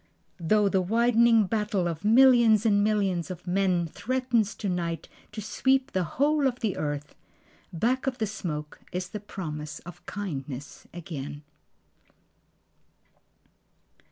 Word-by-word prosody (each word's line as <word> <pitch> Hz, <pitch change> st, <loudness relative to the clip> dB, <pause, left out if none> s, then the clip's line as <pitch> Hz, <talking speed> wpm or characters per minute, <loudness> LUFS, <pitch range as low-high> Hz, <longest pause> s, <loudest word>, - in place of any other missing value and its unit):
Though 205 Hz, +5 st, +3 dB
the 190 Hz, -1 st, +2 dB
widening 230 Hz, +2 st, +4 dB
battle 210 Hz, -3 st, 0 dB
of 165 Hz, 0 st, -4 dB
millions 230 Hz, -1 st, +6 dB
and 205 Hz, -2 st, +4 dB
millions 195 Hz, -5 st, 0 dB
of 180 Hz, -2 st, -8 dB
men 180 Hz, -1 st, +1 dB
Threatens 240 Hz, +3 st, -1 dB
to 205 Hz, -, -4 dB
night 170 Hz, -3 st, -2 dB, 0.2 s
to 215 Hz, 0 st, -6 dB
sweep 265 Hz, +5 st, +1 dB
the 185 Hz, -, 0 dB
whole 290 Hz, +1 st, +3 dB
of 250 Hz, -1 st, -3 dB
the 215 Hz, -5 st, 0 dB
earth, 145 Hz, -1 st, -4 dB, 0.6 s
Back 245 Hz, +10 st, 0 dB
of 260 Hz, -1 st, -1 dB
the 220 Hz, -, 0 dB
smoke 155 Hz, -7 st, -5 dB
is 180 Hz, 0 st, -4 dB
the 210 Hz, -, -5 dB
promise 155 Hz, -7 st, -6 dB
of 175 Hz, -2 st, -11 dB
kindness 145 Hz, -8 st, -6 dB
again. 150 Hz, -4 st, -7 dB
200 Hz, 130 wpm, -27 LUFS, 170-230 Hz, 0.6 s, millions